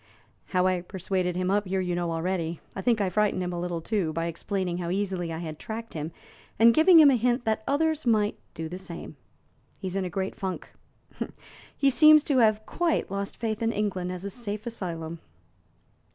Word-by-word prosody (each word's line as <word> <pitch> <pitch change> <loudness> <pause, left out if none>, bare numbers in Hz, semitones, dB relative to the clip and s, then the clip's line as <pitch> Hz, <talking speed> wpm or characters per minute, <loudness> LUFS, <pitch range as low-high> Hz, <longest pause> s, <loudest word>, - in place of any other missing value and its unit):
How 180 0 +1
I 185 -1 +2
persuaded 180 0 -2
him 185 +1 0
up 205 0 +1
here 190 +1 0
you 180 -1 -1
know 175 -1 -1
already; 165 0 -2 0.2
I 195 - -3
think 235 0 +2
I 200 -2 +1
frightened 210 -1 +1
him 180 0 -3
a 175 - -3
little, 175 -1 -3
too, 190 -3 -1
by 165 +1 -1
explaining 180 +1 -2
how 170 -1 -3
easily 185 -3 -1
I 160 - -4
had 160 -2 -6
tracked 225 0 -6
him, 155 +1 -4 0.5
and 230 +1 +7
giving 325 +4 +7
him 295 -3 +8
a - - +4
hint 245 +1 +1
that 220 0 0
others 315 +2 +1
might 215 -2 +2 0.2
do 160 0 -4
the 180 +3 -7
same. 180 -3 -8 0.6
He - - -9
is 180 - -7
in 195 - 0
a 180 - -3
great 190 +2 -3
funk. 190 -2 -5 1.1
He 275 -1 +4
seems 305 +2 +7
to 280 -4 +2
have 215 -2 +3
quite 340 - 0
lost 200 0 -3
faith 225 -1 -2
in 225 0 +1
England 190 -4 -2
as 185 +1 -5
a 200 - -3
safe 215 -1 -5
asylum." 170 -7 -5
190 Hz, 205 wpm, -27 LUFS, 175-225 Hz, 1.1 s, him